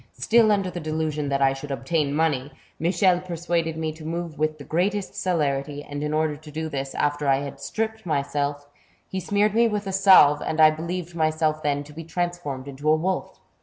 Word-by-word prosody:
Still 220 - +4
under 195 -3 +1
the 175 - -5
delusion 155 -2 -2
that 140 0 +1
I 135 0 +4
should 135 +2 -8
obtain 140 +2 -1
money, 145 -3 0 0.3
Michel 175 +2 +3
persuaded 170 -2 -2
me 160 -1 -2
to 155 0 -12
move 165 -1 -4
with 155 0 0
the 145 - -10
greatest 190 +7 -1
celerity, 145 -4 -1
and 145 0 -6
in 150 - -2
order 155 -1 +1
to 150 +1 -13
do 160 +1 -4
this, 135 -2 -4
after 145 0 0
I 135 0 +3
had 140 -1 -7
stripped 220 +9 -3
myself, 145 -2 -2 0.4
he 190 - -4
smeared 205 +2 +1
me 230 +1 +4
with 210 -2 -2
a 195 - -3
salve, 185 -7 +6
and 160 0 -3
I 155 0 +8
believed 170 +2 -5
myself 155 -1 0
then 145 -1 0
to 150 +1 -14
be 165 +2 -7
transformed 165 -6 -3
into 140 +2 -3
a 155 - +6
wolf. 185 +4 -2
155 Hz, 205 wpm, -24 LUFS, 145-175 Hz, 0.4 s, I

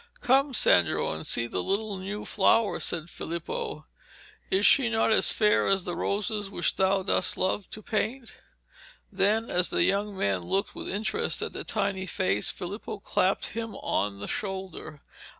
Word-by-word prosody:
'Come, 270 +3 +3
Sandro, 90 - +4
and 80 0 -5
see 115 - +3
the 95 -6 -3
little 205 - -2
new 200 +3 -6
flower,' 210 +1 +2
said 165 -2 -1
Filippo. 425 - -5 0.7
'Is 195 +2 +2
she 255 -4 +6
not 225 -1 +2
as - - +5
fair 210 -1 +3
as 195 -1 +2
the 175 -1 -4
roses 205 +1 -2
which - - 0
thou 190 0 +2
dost 190 - +1
so - - -7
love 190 +1 -1
to 215 - -9
paint?' 230 +4 -3 0.8
Then, 220 +3 +1
as 180 0 +3
the - - +1
young 200 0 0
man 100 - 0
looked 195 - -1
with - - -7
interest 220 - -1
at - - -5
the - - -5
tiny 190 -1 -1
face, 95 - 0
Filippo 200 +4 -6
clapped 190 -1 0
him 225 -2 -5
on 100 - -2
the 100 - -6
shoulder. 190 -6 -5
195 Hz, 170 wpm, -27 LUFS, 175-215 Hz, 0.8 s, she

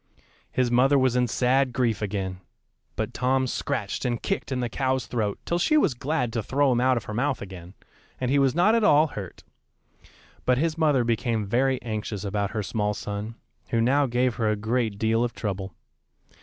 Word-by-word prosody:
His 125 -1 +1
mother 135 +4 +4
was 130 -2 +2
in 125 -1 +2
sad 130 +2 +2
grief 115 -5 0
again; 95 -3 -3 0.6
but - - -3
Tom 130 +1 +1
scratched 125 - -3
and 120 -2 -1
kicked 195 - -3
in 130 - -1
the 120 - -1
cow's 130 +2 -1
throat 105 -4 -2
till 170 - 0
she 305 - +3
was 165 - +3
glad 125 -2 -2
to 115 - 0
throw 135 +5 +1
him 120 -1 +2
out 130 0 +3
of 115 - -3
her 110 - -7
mouth 135 +4 0
again, 95 -1 -10 0.4
and 125 0 -1
he 140 - +4
was 135 0 +2
not 180 +6 +4
at 230 -1 +3
all 150 -6 +6
hurt; 100 -9 -8 1.0
but 125 -1 +2
his 160 +3 0
mother 150 -6 +3
became 115 -1 0
very 130 +5 +1
anxious 105 -3 -4
about 100 0 -1
her 110 -1 -3
small 105 +1 -1
son, 105 +3 -5 0.3
who 115 - +1
now 135 +5 +3
gave 125 0 +1
her 110 -2 +1
a 105 - +1
great 110 0 -1
deal 115 +2 +1
of 120 - -2
trouble. 95 -2 -4
120 Hz, 195 wpm, -25 LUFS, 105-130 Hz, 1.0 s, all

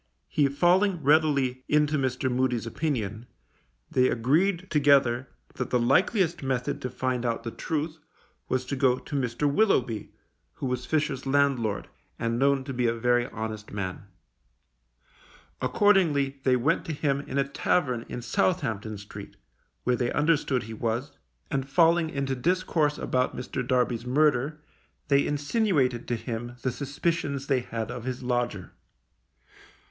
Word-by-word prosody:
He 145 -2 +2
falling 175 +4 +2
readily 140 -4 +3
into 150 0 +3
Mr. 130 -2 0
Moody's 125 -2 0
opinion, 115 -4 -3 0.6
they 130 0 +3
agreed 170 - +1
together 135 -4 +3 0.2
that - - -4
the 125 - +2
likeliest 175 - +2
method 130 -2 -2
to 125 - -3
find 125 0 -2
out 115 -2 -1
the 115 - -4
truth 155 +3 -3 0.5
was 130 0 0
to 140 - -3
go 130 -2 +3
to 145 - -7
Mr. 130 +1 0
Willoughby, 135 - +1 0.4
who - - -6
was 125 -1 -2
Fisher's 145 -4 -1
landlord, 135 -7 +1 0.3
and 115 +1 -1
known 140 0 +3
to 135 0 -5
be 125 -1 +1
a 115 - +1
very 120 +1 +2
honest 110 -3 -6
man. 100 -1 -5 1.5
Accordingly 155 -10 +3
they 130 -1 +4
went 140 +7 +1
to 165 - -3
him 140 -2 0
in 140 -1 -5
a 140 0 +2
tavern 130 -4 0
in 120 - -5
Southampton 110 0 0
Street, 100 0 -10 0.5
where 125 - +2
they 120 0 -1
understood 145 -4 +1
he 115 +2 -8
was, 115 +4 -2 0.4
and 135 -2 -2
falling 165 +1 +4
into 140 -2 -2
discourse 155 +1 +1
about 125 0 -1
Mr. 125 - -4
Darby's 125 -2 +1
murder, 150 +2 +2 0.5
they 140 0 +4
insinuated 145 - +1
to 120 - 0
him 120 +1 -5
the 130 - +1
suspicions 140 +1 -2
they 135 -2 +2
had 115 -1 -4
of 120 -1 -6
his 130 0 -4
lodger. 120 -6 -2
130 Hz, 145 wpm, -27 LUFS, 120-150 Hz, 1.5 s, they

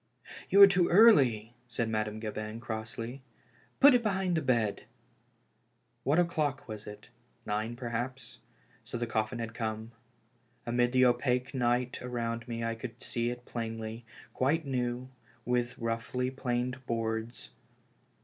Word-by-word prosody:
You 200 - +5
are - - +12
too 185 -3 +3
early," 130 - +6
said 115 -1 -2
Madame 110 -1 -2
Gabin, 110 0 -5
crossly. 115 +3 -5 0.3
" - - -33
Put 285 0 +9
it 245 - +4
behind 190 -5 0
the 160 - +1
bed." 115 -7 0 1.2
AVhat 145 +3 +4
o'clock 155 -6 0
was 110 -2 -7
it? 105 0 -10 0.4
Nine, 110 +3 -2
perhaps. 120 +2 -5 0.4
So - - -5
the 120 - -1
coffiYi 110 +1 -1
had 115 -1 -4
come. 110 0 -4 0.7
Amid 120 +1 +2
the 130 0 +5
opaque 125 +1 +1
night 125 -1 0
around 115 -1 -3
me 115 -1 -4
I 115 0 0
could 115 +1 -8
see 120 0 -1
it 120 0 -6
plainly, 115 0 -5 0.3
quite 150 +5 +1
new, 125 -1 -2 0.4
with 125 0 0
roughly 115 +2 -2
planed 125 0 -2
boards. 115 0 -3
120 Hz, 140 wpm, -30 LUFS, 115-130 Hz, 1.2 s, are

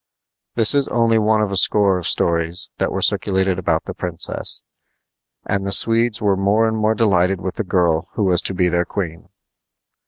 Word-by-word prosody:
This 115 +1 +3
is 140 -1 +1
only 115 -1 +1
one 110 0 +2
of 100 - -3
a - - -2
score 100 -1 +3
of 85 - -2
stories 85 +1 -1
that - - -1
were - - -2
circulated 95 -1 0
about 90 - -1
the - - -7
princess, 85 -2 -2 0.8
and 100 -1 -2
the 100 - -3
Swedes 115 +2 +2
were 100 -2 +1
more 100 +4 +1
and 110 - -2
more 110 0 0
delighted 95 -4 +1
with 90 0 -5
the 110 - -1
girl 85 -4 0
who 110 - -1
was 90 -2 +3
to 95 - -2
be 90 0 +1
their 85 0 0
queen. 85 -3 -6
95 Hz, 190 wpm, -19 LUFS, 90-110 Hz, 0.8 s, This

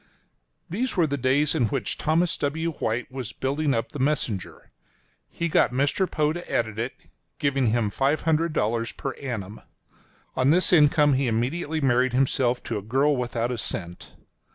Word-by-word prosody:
These 225 +6 -2
were 170 - +4
the 145 -2 -1
days 140 +3 +2
in 135 -8 +2
which - - -2
Thomas 165 +2 +2
W. 160 +4 -1
White 120 -5 -3
was 130 -4 -6
building 140 +2 0
up 115 - -2
the 145 - -7
Messenger. 130 -8 -2 0.6
He 170 - -2
got 150 - +3
Mr. 140 +8 +1
Poe 150 0 +1
to 175 +1 -7
edit 110 -2 -1
it, 120 +3 -2 0.4
giving 140 -3 +1
him 110 -2 +1
$500 140 -5 0
per 135 - -3
annum. 110 -7 -6 0.7
On 130 +1 +2
this 180 +4 +4
income, 150 -2 +5
he 135 0 +1
immediately 145 +8 -1
married 130 -1 +2
himself 125 -1 +1
to 110 -3 -3
a - - -8
girl 135 +8 +2
without 120 -1 -2
a 120 - -3
cent. 85 -3 -5
135 Hz, 160 wpm, -25 LUFS, 120-150 Hz, 0.7 s, income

